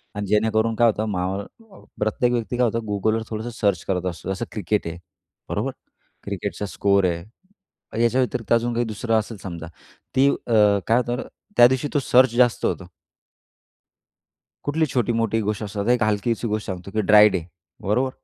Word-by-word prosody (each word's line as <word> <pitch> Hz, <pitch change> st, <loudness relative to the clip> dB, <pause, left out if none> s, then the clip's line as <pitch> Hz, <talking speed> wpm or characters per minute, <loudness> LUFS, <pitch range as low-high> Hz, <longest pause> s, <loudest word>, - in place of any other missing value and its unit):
आणि 105 Hz, 0 st, -3 dB
जेणेकरून 110 Hz, +2 st, +2 dB
काय 120 Hz, +1 st, +4 dB
होतं 110 Hz, 0 st, 0 dB
माहो 95 Hz, 0 st, -1 dB
अ, 215 Hz, -, -16 dB, 0.2 s
प्रत्येक 110 Hz, +3 st, +1 dB
व्यक्ती 120 Hz, 0 st, -2 dB
काय 125 Hz, -, +3 dB
होतं, 115 Hz, 0 st, 0 dB
Googleवर 110 Hz, +2 st, 0 dB
थोडंसं 110 Hz, +2 st, -4 dB
सर्च 100 Hz, -6 st, +1 dB
करत 90 Hz, -2 st, -1 dB
असतो. 90 Hz, +1 st, -4 dB
जसं 95 Hz, +5 st, -3 dB
क्रिकेट 105 Hz, -2 st, -1 dB
आहे. 85 Hz, +1 st, -5 dB, 0.5 s
बरोबर. -, -, -1 dB, 0.5 s
क्रिकेटचा 100 Hz, +1 st, -4 dB
स्कोअर 100 Hz, 0 st, +2 dB
आहे, 85 Hz, -1 st, -1 dB, 0.8 s
याच्या 125 Hz, +3 st, +3 dB
व्यतिरिक्त 125 Hz, -2 st, -3 dB
अजून 115 Hz, +1 st, +2 dB
काही 120 Hz, +1 st, 0 dB
दुसरं 110 Hz, +1 st, -1 dB
असेल 110 Hz, 0 st, -6 dB
समजा 85 Hz, -3 st, -6 dB, 0.5 s
ती 135 Hz, +1 st, +5 dB
अ, 120 Hz, -, -2 dB, 0.3 s
काय 115 Hz, +2 st, +4 dB
होतं 120 Hz, -1 st, 0 dB
ना? -, -, -4 dB, 0.3 s
त्यादिवशी 130 Hz, +3 st, +5 dB
तो 145 Hz, -, +3 dB
सर्च 125 Hz, -2 st, +4 dB
जास्त 120 Hz, -1 st, +3 dB
होतो. 95 Hz, -, -1 dB, 1.8 s
कुठली 155 Hz, +2 st, +1 dB
छोटी-मोठी 115 Hz, -3 st, +1 dB
गोष्ट 105 Hz, 0 st, -2 dB
असतात. 100 Hz, +1 st, -4 dB
एक 125 Hz, -1 st, +3 dB
हलकीशी 110 Hz, +2 st, 0 dB
गोष्ट 105 Hz, 0 st, -2 dB
सांगतो 95 Hz, 0 st, -6 dB
की 110 Hz, +2 st, 0 dB
ड्राय 105 Hz, 0 st, +7 dB
डे. 95 Hz, -4 st, -2 dB, 0.4 s
बरोबर. 125 Hz, +7 st, +1 dB
110 Hz, 170 wpm, -23 LUFS, 100-120 Hz, 1.8 s, ड्राय